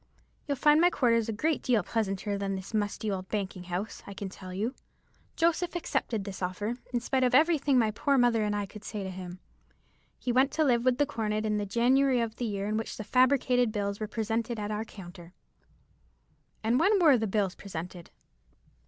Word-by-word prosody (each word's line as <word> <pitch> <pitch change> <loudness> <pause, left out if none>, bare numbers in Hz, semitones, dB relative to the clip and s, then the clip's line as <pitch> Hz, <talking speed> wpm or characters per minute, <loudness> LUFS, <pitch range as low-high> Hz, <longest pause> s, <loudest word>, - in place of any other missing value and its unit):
You'll 285 -2 -1
find 300 +3 +5
my 350 - +6
quarters 230 -7 +2
a - - +1
great 305 +8 0
deal 235 -6 +2
pleasanter 205 -1 -2
than 200 -1 -2
this 190 +3 -8
musty 210 0 -1
old 185 -1 -4
banking 190 -3 -3
house, 180 +5 -4
I 200 - -8
can 195 0 -5
tell 185 -1 -10
you.' 210 +7 -2 0.6
Joseph 340 +1 +1
accepted 230 - -2
this 195 -1 -7
offer, 205 +7 -3
in 245 - 0
spite 260 +2 0
of 250 0 +3
everything 295 -2 +4
my 225 -3 +3
poor 275 +6 +1
mother 240 -3 +3
and 210 0 0
I 205 0 -1
could 210 +2 -12
say 210 -2 -5
to 190 - -5
him. 180 -1 -8 0.8
He 250 - -2
went 260 +3 +3
to 315 +1 +2
live 240 -5 +3
with 255 -1 +3
the 290 - +3
cornet 220 -5 -2
in 210 -1 0
the 205 - -3
January 250 +4 +3
of 230 -1 -2
the 245 - -2
year 200 -3 -2
in 215 +1 0
which 225 - -4
the 215 - -5
fabricated 250 0 +3
bills 200 -1 -2
were 215 - -3
presented 225 +1 -2
at 210 0 -3
our 215 +1 -2
counter." 175 -4 -12 1.3
"And 230 +3 +2
when 395 +4 +4
were 315 -6 +6
the 220 -2 0
bills 195 -2 0
presented?" 175 -3 -8
220 Hz, 205 wpm, -29 LUFS, 200-255 Hz, 1.3 s, my